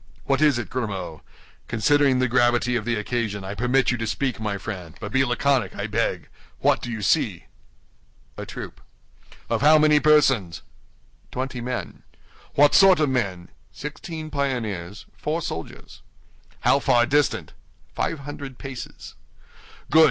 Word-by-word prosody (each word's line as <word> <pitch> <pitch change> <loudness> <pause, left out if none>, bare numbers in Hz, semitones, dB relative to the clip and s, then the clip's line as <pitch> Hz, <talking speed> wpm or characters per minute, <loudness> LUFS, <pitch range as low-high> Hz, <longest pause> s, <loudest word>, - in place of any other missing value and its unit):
What 135 +1 +1
is 150 -5 +4
it, 120 -5 -3
Grimaud? 100 -10 -4 0.5
Considering 140 +4 +3
the 130 0 +2
gravity 120 0 +2
of 110 -3 -2
the 120 0 0
occasion, 105 -2 -2
I 95 +1 -5
permit 125 +4 +2
you 120 - -2
to 115 - -2
speak, 130 +1 -2
my 105 -2 -2
friend; 95 -5 -7
but 105 -1 -6
be 135 +3 +3
laconic, 130 -3 +1
I - - -3
beg. - - -1 0.3
What - - +2
do 120 - -5
you 110 -3 -4
see?" - - +1 0.9
"A - - -6
troop." - - -8 0.7
"Of - - -1
how 155 +2 +7
many 150 -1 +5
persons?" 135 - +3 0.7
"Twenty 130 -1 -4
men." 125 +1 -5 0.5
"What 145 0 +5
sort 190 -3 +7
of 150 -2 +2
men?" 100 -9 -2 0.2
"Sixteen 155 +2 -7
pioneers, 110 -10 -3
four 155 +2 -2
soldiers." 80 - -7 0.6
"How - - +4
far 120 -1 +3
distant?" 145 +1 0 0.4
"Five 155 - -2
hundred 140 -2 -8
paces." 135 -3 -8 0.8
"Good! 160 - +6
125 Hz, 145 wpm, -24 LUFS, 110-145 Hz, 0.9 s, how